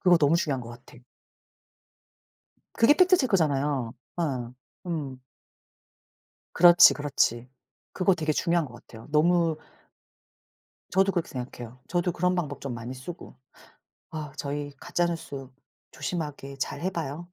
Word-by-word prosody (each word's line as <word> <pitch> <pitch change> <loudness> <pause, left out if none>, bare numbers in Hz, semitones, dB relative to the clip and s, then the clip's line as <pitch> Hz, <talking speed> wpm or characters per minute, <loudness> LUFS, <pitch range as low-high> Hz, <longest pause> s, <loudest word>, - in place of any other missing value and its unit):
그거 180 -2 +5
너무 150 +1 +4
중요한 140 -6 -1
것 115 - -9
같아. 120 0 -14 1.7
그게 230 +5 +5
팩트 365 +2 +5
체크잖아요. 145 - +1 0.2
어. 130 -7 -2 0.3
음. 145 -6 -4 1.3
그렇지, 175 0 +8
그렇지. 130 -4 0 0.4
그거 190 0 +3
되게 155 -2 -1
중요한 170 +1 +1
것 125 - -13
같아요. 115 -1 -14
너무 165 +1 +3 1.3
저도 195 +1 +3
그렇게 175 -3 -1
생각해요. 125 -1 -7
저도 175 0 0
그런 180 +1 +1
방법 145 -5 -3
좀 135 -3 -4
많이 120 +2 -6
쓰고. 130 +3 -9 0.8
아 155 -3 -6
저희 145 0 -4
가짜 175 - 0
뉴스 140 -6 -5 0.4
조심하게 145 -5 -5
잘해 185 +7 -2
봐요. 165 +1 -5
150 Hz, 260 characters per minute, -27 LUFS, 135-175 Hz, 1.7 s, 그렇지